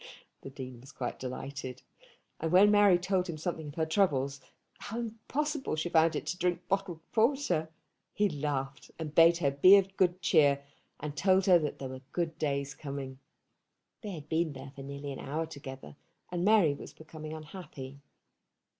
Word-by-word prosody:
The - - -8
Dean 130 -3 -8
was 135 - -13
quite 125 - -5
delighted; 130 0 -6 0.6
and 160 0 -2
when 195 +3 +7
Mary 205 -3 +6
told 180 0 0
him 160 - -4
something 160 -1 -4
of 145 - -9
her 160 - +1
troubles, 140 -6 +1 0.4
how 225 - -6
impossible 265 - -2
she 155 +2 -2
found 165 -1 +4
it - - -3
to 180 - -3
drink 180 0 -1
bottled 190 -4 -1
porter, 220 - +2 0.4
he 210 - +2
laughed, 145 -4 -3
and 155 -2 -5
bade 165 +1 +7
her 145 -5 +1
be 185 +8 +8
of 195 0 0
good 180 -1 +2
cheer, 145 -6 +3 0.3
and 150 -1 -5
told 190 +1 +3
her 180 -3 +7
that 150 -3 -3
there 135 - -6
were 130 0 -8
good 170 -2 -2
days 140 -2 -1
coming. 135 -2 -6 0.8
They 210 - -6
had 155 -3 -8
been 160 -1 0
there 135 0 -9
for 140 - -8
nearly 140 +1 -6
an 135 - -6
hour 155 +4 -2
together, 135 - -9 0.4
and 175 -1 -1
Mary 200 -7 +5
was - - -10
becoming 155 0 -9
unhappy. 150 -4 -9
160 Hz, 175 wpm, -31 LUFS, 140-180 Hz, 0.8 s, be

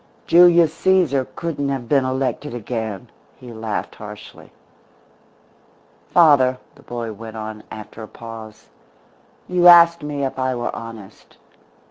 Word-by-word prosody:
Julius 170 -1 +5
Caesar 175 -9 +2
couldn't 150 -4 -3
have 135 -4 -4
been 135 +1 +2
elected 130 0 -3
again," 110 -4 -5 0.3
he 125 -2 -11
laughed 110 -1 -4
harshly. 105 0 -12 1.6
"Father," 140 -7 +4 0.2
the - - -20
boy 115 -2 -6
went 110 +1 -10
on, 110 0 -7
after 110 +1 -10
a 110 - -8
pause, 110 -2 -11 0.8
"you 180 -1 +3
asked 170 -1 +7
me 145 -1 -3
if 135 - -5
I 130 0 -1
were 120 0 -4
honest. 115 -4 -11
130 Hz, 125 wpm, -20 LUFS, 110-150 Hz, 1.6 s, asked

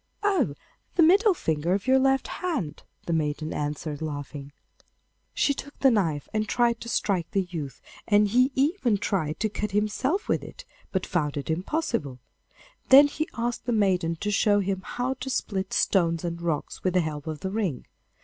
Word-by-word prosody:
'Oh, 365 - +2 0.4
the 340 - +5
middle 390 +4 +5
finger 160 - 0
of 200 - -3
your 260 +1 +5
left 270 0 +2
hand,' 300 - -3 0.2
the 170 - -1
maiden 155 0 -1
answered, 150 0 -3
laughing. 145 -2 -6 0.8
She 285 - +2
took 285 +1 -9
the 270 - +4
knife 165 -10 0
and 215 -1 -1
tried 235 -1 +2
to 235 - -6
strike 190 -7 0
the 195 - +1
youth, 145 -7 -6 0.2
and 210 0 +4
he 250 +6 +3
even 270 - +2
tried 190 -7 -1
to 220 - +2
cut 210 -1 -4
himself 230 - 0
with - - +1
it, - - -11 0.3
but 190 -1 -1
found 150 -6 -1
it 145 +3 -3
impossible. 180 - -2 0.7
Then 275 +2 +10
he 310 +2 -3
asked 240 0 -2
the - - +1
maiden 185 -6 +2
to 210 - -1
show 205 0 +3
him 195 -1 -1
how 250 +2 -2
to 265 - -5
split 195 -6 -2
stones 170 -3 +2
and 170 -1 -4
rocks 165 -4 -3
with 185 -1 0
the 180 - +5
help 150 -2 -5
of 155 -1 -5
the 190 - -3
ring. 195 - -2
195 Hz, 180 wpm, -26 LUFS, 160-245 Hz, 0.8 s, Then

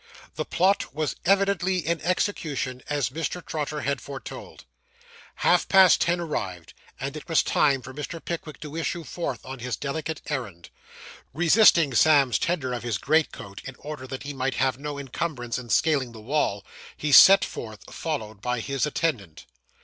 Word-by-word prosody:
The - - -4
plot 190 -4 +1
was 155 -1 -1
evidently 195 -1 +2
in 170 +1 -1
execution, 150 -8 -2
as 145 -5 0
Mr. 165 +3 -4
Trotter 150 -1 -3
had 140 0 -1
foretold. 140 -1 -9 0.7
Half - - +2
past 190 -3 +6
ten 175 +1 +2
o'clock 170 -3 -5
arrived, 90 - -4 0.3
and 140 +2 -4
it 155 +1 -9
was 165 - +4
time 140 -4 +2
for 130 - -9
Mr. 150 +4 -6
Pickwick 160 -3 -6
to 150 0 -8
issue 165 +1 -2
forth 170 +2 -5
on 130 0 -7
his 125 0 -3
delicate 155 +2 -4
errand. 105 - -5 0.6
Resisting 170 - +5
Sam's 140 -4 +4
tender 145 -8 -1
of 120 - -3
his 120 -1 -2
greatcoat, 145 -9 -1
in 130 - -8
order 145 -3 -8
that 130 +1 -6
he 145 0 -5
might 135 0 -2
have 130 -1 0
no 145 0 -5
encumbrance 135 -3 -4
in 120 -2 -10
scaling 135 +1 +2
the 110 - -10
wall, 110 -4 -1 0.3
he 150 - -2
set 195 +8 +9
forth, 110 -3 -8
followed 110 -11 -4
by 125 +1 -1
his 135 +4 -1
attendant. 115 - -2
145 Hz, 165 wpm, -25 LUFS, 125-160 Hz, 0.7 s, set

